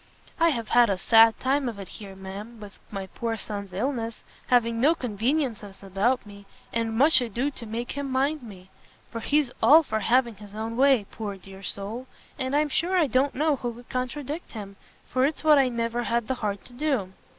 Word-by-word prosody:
I 335 0 +5
have 235 -7 -2
had 240 -2 +5
a 195 - +1
sad 225 +3 +6
time 270 0 +1
of 225 - -7
it 195 -2 -7
here, 200 -3 -10
ma'am, 200 +4 -8
with 205 -2 -11
my 195 -2 -5
poor 225 +4 -4
son's 200 -3 -5
illness, 230 +2 -3 0.2
having 230 -2 +2
no 310 +6 +5
conveniencies 230 -4 -2
about 200 +7 0
me, 200 -1 -13 0.3
and 225 -1 -1
much 275 0 +6
ado 245 +4 -1
to 245 - -8
make 230 +3 -4
him 280 -1 -4
mind 275 +3 +1
me; 190 -5 -12 0.4
for 230 - -4
he's 285 +2 +1
all 320 +3 +8
for 220 -6 -2
having 235 0 +2
his 205 0 -12
own 225 +1 -4
way, 265 -4 +4
poor 205 -3 -5
dear 195 +1 -13
soul, 205 +6 -4 0.3
and 260 +2 -1
I'm 300 0 +2
sure 345 +7 +1
I 340 - +4
don't 265 +2 +1
know 300 +1 +2
who 240 -3 -4
could 245 +1 -14
contradict 285 +5 -4
him, 200 -3 -7 0.3
for 255 - +1
it's 290 +3 0
what 305 -2 +6
I 265 -2 +3
never 235 0 -1
had 235 -1 -1
the - - 0
heart 205 -2 -2
to 245 - -10
do. 245 -9 -1
235 Hz, 205 wpm, -26 LUFS, 210-270 Hz, 0.4 s, all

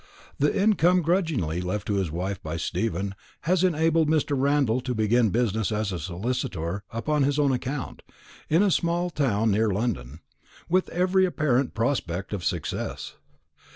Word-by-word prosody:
The 150 +7 +2
income 185 -4 +4
grudgingly 155 - 0
left 95 +3 -3
to 105 - -1
his 95 -4 0
wife 90 +5 -3
by 80 -3 -4
Stephen 100 +2 -2 0.3
has 180 +3 +1
enabled 160 -2 +2
Mr. 150 -2 +1
Randall 135 -3 +2
to 125 -1 -3
begin 110 +1 +3
business 110 0 0
as 105 -1 -1
a 90 - -3
solicitor 90 0 -3
upon 145 +6 -1
his 140 +1 +2
own 145 -2 +3
account, 130 +1 -4 0.5
in 165 +6 +4
a 200 - +3
small 175 +1 0
town 115 -8 +1
near 110 +2 +2
London, 90 - -2 0.5
with 185 +2 +1
every 185 +2 +2
apparent 140 -7 0
prospect 105 -7 -1
of 95 -4 -3
success. 85 -4 -3
120 Hz, 155 wpm, -26 LUFS, 100-155 Hz, 0.5 s, income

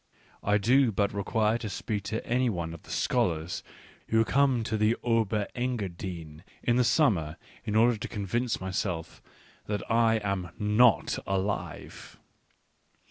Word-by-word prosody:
I 105 +1 +3
do 125 +4 +4
but 100 0 0
require 110 +2 +1
to 110 -2 -5
speak 100 0 -3
to 110 +2 -3
any 125 +1 +1
one 85 -5 -3
of 85 - -10
the - - -18
scholars 85 0 0 0.5
who 110 0 +3
come 135 -3 +2
to 110 -1 -2
the 110 +2 +2
Ober 110 -3 +1
Engadine 90 -10 -4 0.2
in 120 0 +2
the 125 - +4
summer 90 - +2 0.3
in 105 -2 -2
order 115 +1 +4
to - - -5
convince 115 +4 -2
myself 95 -3 -3 0.5
that 105 -1 -2
I 115 0 +4
am 100 -3 -2
not 105 +2 +3
alive. 95 +1 -4
105 Hz, 140 wpm, -28 LUFS, 95-115 Hz, 0.5 s, do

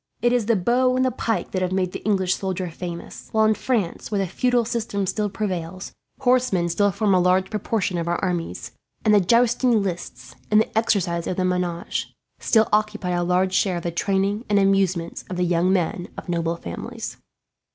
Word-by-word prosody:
It 240 0 +4
is 240 -4 +1
the 230 - +4
bow 250 +6 +2
and 255 0 +2
the 255 - +2
pike 230 -1 -2
that 185 - -1
have 185 0 0
made 185 -1 0
the - - -7
English 190 -3 +2
soldier 185 -2 -3
famous; 170 0 -7
while 220 0 +4
in 215 - +4
France, 215 -6 -2
where 210 - -1
the 195 - +1
feudal 245 +6 +1
system 220 -4 -2
still 205 +3 -1
prevails, 185 -3 -4 0.3
horsemen 245 -9 +2
still 205 +4 +2
form 200 +1 +1
a 185 - +5
large 185 +2 +2
proportion 210 -3 -1
of 170 - -3
our 175 - +1
armies; 175 -3 -3 0.3
and 215 - +5
the 205 - +7
jousting 235 +2 +3
lists, 175 -3 -6 0.2
and 215 - +5
the 220 - -1
exercise 180 -6 +1
of 185 - -2
the 185 - +1
menage, 180 -2 -2 0.2
still 220 -1 +3
occupy 210 -3 +1
a 175 0 0
large 180 +1 +1
share 190 -1 +2
in 170 - -4
the 170 - -2
training 195 +4 0
and 205 - +3
amusements 195 -4 +1
of 185 - -4
the 180 - +1
young 175 +1 +2
men 180 -1 0
of - - -8
noble 170 -1 -1
families." 85 - -7
190 Hz, 200 wpm, -23 LUFS, 180-215 Hz, 0.3 s, the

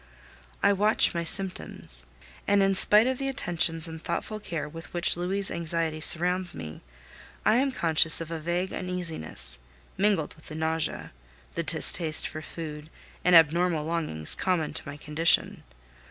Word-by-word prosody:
I 200 - +5
watch 210 +2 +4
my 170 -1 -2
symptoms; 170 - -3 0.4
and 200 -1 +4
in 195 0 +3
spite 210 +3 +6
of 260 0 -1
the 275 - -2
attentions 170 - 0
and 160 -1 -8
thoughtful 215 +6 -4
care 165 -7 -4
with 160 -1 -10
which 175 +1 +1
Louis' 190 +3 -2
anxiety 165 -1 -2
surrounds 180 +3 +1
me, 80 -1 -8 0.6
I 220 - +5
am 270 +2 +2
conscious 165 -7 +3
of 165 0 -6
a 165 - -3
vague 175 +4 -2
uneasiness, 180 - -4 0.4
mingled 195 -6 +1
with 155 - -17
the 155 - -8
nausea, 160 0 -2 0.4
the - - -2
distaste 160 -3 +3
for 155 - -7
food, 155 -1 -8 0.3
and 180 0 +5
abnormal 165 0 +4
longings 155 - -1
common 180 -5 0
to - - -5
my 145 +1 -7
condition. 155 +3 +1
170 Hz, 155 wpm, -27 LUFS, 155-185 Hz, 0.6 s, spite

